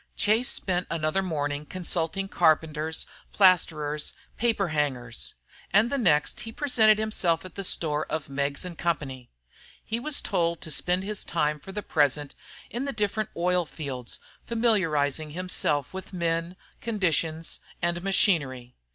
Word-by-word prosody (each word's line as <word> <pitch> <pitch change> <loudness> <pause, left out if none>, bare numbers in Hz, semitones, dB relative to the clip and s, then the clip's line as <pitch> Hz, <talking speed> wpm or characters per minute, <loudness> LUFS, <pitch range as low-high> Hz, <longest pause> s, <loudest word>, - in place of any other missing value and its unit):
Chase 220 +4 +2
spent 180 -1 0
another 160 +3 0
morning 145 -5 -2
consulting 180 +2 -2
carpenters, 160 -2 +2 0.3
plasterer's, 155 -6 +3 0.2
paper 220 -5 +1
hangers; 130 -6 -1 0.4
and 210 +6 +4
the 280 - +1
next 150 -10 +3
he 225 - -6
presented 220 -5 +4
himself 190 -6 0
at 185 - -9
the 195 - -4
store 155 -4 +1
of 155 -1 -3
Meggs 140 +3 -2
& - - -19
Co. 170 0 +2 0.9
He 225 - -2
was 295 +3 +1
told 170 -1 0
to 160 - -7
spend 180 +6 +1
his 210 +1 -3
time 150 -2 0
for 195 - -9
the 210 +1 -4
present 145 -2 +1 0.4
in 245 +4 -2
the 275 - -2
different 210 0 -1
oil 180 +1 +2
fields, 135 -7 -5 0.3
familiarizing 160 - +1
himself 155 -6 0
with 190 +1 -7
men, 170 0 0 0.3
conditions, 165 -7 0 0.2
and 175 0 0
machinery. 140 -10 +2
170 Hz, 140 wpm, -27 LUFS, 150-195 Hz, 0.9 s, and